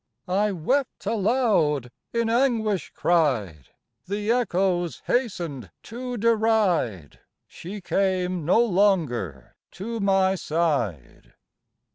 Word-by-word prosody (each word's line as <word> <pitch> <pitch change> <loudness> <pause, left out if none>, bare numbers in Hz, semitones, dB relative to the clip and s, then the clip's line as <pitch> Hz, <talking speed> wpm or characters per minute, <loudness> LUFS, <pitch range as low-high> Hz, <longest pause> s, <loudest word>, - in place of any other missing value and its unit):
I 200 +3 +1
wept 250 - -1
aloud, 200 - +1 0.2
in 230 -1 0
anguish 225 - +1
cried, 120 - +1 0.4
The 205 +3 -1
echoes 180 - 0
hastened 175 - -2
to 245 +1 -6
deride! 210 - +1 0.3
She 195 +4 -8
came 185 -2 0
no 220 +9 +4
longer 160 - 0 0.2
to 225 +5 -5
my 195 -1 +3
side. 150 - -2
190 Hz, 90 wpm, -24 LUFS, 155-225 Hz, 0.4 s, no